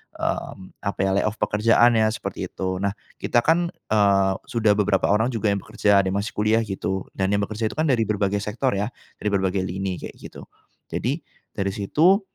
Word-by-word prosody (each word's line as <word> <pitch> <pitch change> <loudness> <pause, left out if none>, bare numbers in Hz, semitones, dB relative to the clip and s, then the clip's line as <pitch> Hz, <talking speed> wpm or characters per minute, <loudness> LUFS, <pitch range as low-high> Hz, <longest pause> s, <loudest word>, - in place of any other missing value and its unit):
mmm, 95 -1 -4
apa, 100 - -2
ya, 95 - +2
layoff 110 +1 0
pekerjaannya, 115 +1 +4
seperti - - -5
itu. 95 -1 -2
Nah, 100 +1 -1 0.2
kita 120 - +2
kan, 170 +1 +3
eee, 100 -2 +2
sudah 110 -3 +2
beberapa 100 -2 +2
orang 110 +5 +2
juga 110 -2 0
yang 100 - +1
bekerja, 105 -1 +2
ada - - -2
yang 100 +1 0
masih 105 -1 -5
kuliah 110 +2 +3
gitu, 95 -2 -3
dan 95 +1 +1
yang 100 - +2
bekerja 110 +2 -3
itu - - -10
kan 155 -1 +1
dari 115 -4 +3
berbagai 100 -1 0
sektor, 120 +5 -1
ya. 105 +3 -1 0.3
Dari 105 - -2
berbagai 95 -1 +1
lini 95 0 -3
kayak, - - -7
gitu. - - -10 0.5
Jadi, 130 +7 -1 0.4
dari 100 -1 -1
situ, 160 - +3
105 Hz, 190 wpm, -23 LUFS, 100-115 Hz, 0.5 s, pekerjaannya